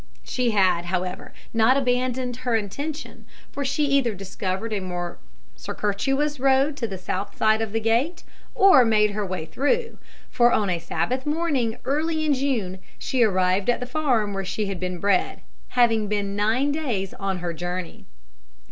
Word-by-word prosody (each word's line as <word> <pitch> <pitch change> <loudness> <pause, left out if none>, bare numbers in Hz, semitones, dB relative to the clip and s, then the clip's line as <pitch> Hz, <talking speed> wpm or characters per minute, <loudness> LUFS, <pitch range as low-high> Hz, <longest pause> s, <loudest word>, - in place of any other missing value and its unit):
She 250 -2 0
had, 190 -5 +2
however, 180 +1 -3 0.2
not 230 +4 +4
abandoned 250 -1 0
her 250 -2 -1
intention, 280 +9 -4 0.3
for 280 - -3
she 285 +2 +1
either 275 -6 +2
discovered 190 +2 -4
a 205 - 0
more 180 -2 -5 0.4
circuitous 270 +8 -1
road 270 +2 +3
to 235 - -2
the 195 -3 -6
south 190 +2 -4
side 220 0 +3
of 220 -2 -2
the 225 - 0
gate, 235 +10 0 0.3
or 385 -10 +7
made 215 -2 +3
her 210 +1 -2
way 185 -4 -4
through; 455 - -1 0.3
for 240 0 +4
on 205 -4 +2
a 175 - 0
Sabbath 170 - -2
morning 295 -8 0
early 310 +3 0
in 300 - +3
June 240 -9 -1 0.2
she 260 -2 -1
arrived 190 -1 +2
at 240 - +2
the 250 - -4
farm 250 -7 0
where 195 0 -2
she 210 +3 -2
had 195 -2 -4
been 180 0 -3
bred, 200 -1 +1 0.4
having 225 -3 +4
been 200 -1 -1
nine 225 +8 +2
days 240 - -2
on 195 -1 -3
her 175 -1 -3
journey. 175 +1 -5
225 Hz, 165 wpm, -24 LUFS, 195-265 Hz, 0.4 s, or